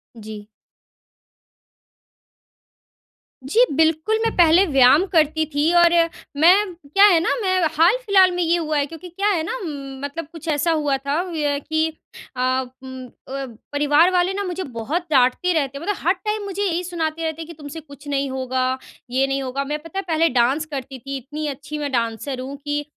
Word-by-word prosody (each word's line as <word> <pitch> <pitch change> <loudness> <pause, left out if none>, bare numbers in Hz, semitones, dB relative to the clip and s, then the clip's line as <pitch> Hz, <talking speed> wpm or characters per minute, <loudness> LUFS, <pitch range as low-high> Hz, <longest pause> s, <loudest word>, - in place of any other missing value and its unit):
जी। 215 -1 -9 3.0
जी, 445 - +3
बिल्कुल, 320 +7 +2
मैं 455 - +1
पहले 345 +2 +5
व्यायाम 275 +3 +5
करती 315 -1 +3
थी 300 +4 +2
और 340 -1 +6 0.5
मैं 370 +3 +5
क्या 335 +5 +3
है 360 -5 +6
ना, 335 - 0
मैं 370 -2 +1 0.2
हाल-फ़िलहाल 385 0 +4
में 355 - -2
ये 335 +1 +2
हुआ 310 -3 -1
है। 285 - +1
क्योंकि 325 +4 -10
क्या 395 +4 -2
है 345 -6 +1
ना, 340 - -3 0.5
मतलब 290 +2 -7
कुछ 330 -1 -11
ऐसा 310 +2 +1
हुआ 295 -3 +1
था 280 +3 -2
अ, 310 -5 -1
कि 315 +2 0 0.5
अ, - - -1 0.4
उम, 260 -1 -8
अ, 270 +2 -8 0.3
परिवार 295 +4 +3
वाले 365 +1 +1
ना 405 +1 -2
मुझे 365 0 -4
बहुत 275 +8 -4
डाँटते 265 +7 +3
रहते 280 -4 -1
हैं, 305 - -8
मतलब 410 +2 -1
हर 355 - +5
टाइम 425 +2 -4
मुझे 400 0 -3
यही 360 -2 -1
सुनाते 330 -2 -3
रहते 320 0 -3
हैं 320 - -7
कि, 335 - -9
"तुमसे 295 0 -9
कुछ 285 -1 -15
नहीं 280 -1 -1
होगा, 260 0 -1 0.3
ये 260 +2 +2
नहीं 275 0 -1
होगा।" 265 +2 -3
मैं, 300 +2 -3
पता 360 +4 -5
है - - -3
पहले 330 0 +2
डांस 260 +5 +1
करती 270 -3 -7
थी। 275 +2 -5
इतनी 295 +4 -6
अच्छी 290 +2 -6
मैं 290 -1 -3
डांसर 235 +2 -2
हूँ 265 +2 -6
कि 290 0 -2
310 Hz, 185 wpm, -21 LUFS, 275-350 Hz, 3.0 s, और